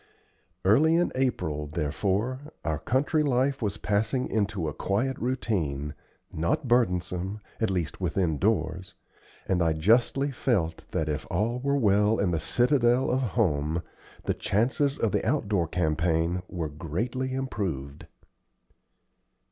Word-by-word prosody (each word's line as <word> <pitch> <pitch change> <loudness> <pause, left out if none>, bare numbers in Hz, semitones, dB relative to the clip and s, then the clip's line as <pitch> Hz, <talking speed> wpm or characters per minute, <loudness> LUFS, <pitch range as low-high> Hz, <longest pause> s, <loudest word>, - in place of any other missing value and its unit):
Early 150 +12 +5
in 175 +1 +2
April, 90 - -1
therefore, 95 - -1 0.3
our 80 -2 -1
country 140 - +1
life 135 -1 +1
was 105 -3 -1
passing 110 +5 0
into 100 -5 -1
a 75 - -3
quiet 110 - -1
routine, 85 - -1 0.4
not 85 - 0
burdensome, 95 -4 +1 0.2
at 110 - +1
least 90 -2 -2
within 85 -4 0
doors; 95 -3 0 0.5
and 90 -2 +1
I 80 -1 +3
justly 120 - +3
felt 95 -11 -1
that 80 - -1
if 75 -2 -3
all 115 +7 0
were 140 +2 +1
well 105 -2 +3
in 95 -3 +1
the 80 - 0
citadel 120 - +2
of 130 +1 +1
home, 85 - 0 0.4
the - - 0
chances 130 +7 +1
of 115 - +1
the - - 0
outdoor 100 -5 +1
campaign 80 +1 0
were 85 -3 -3
greatly 115 - -3
improved. 90 - -4
100 Hz, 130 wpm, -27 LUFS, 80-125 Hz, 0.5 s, Early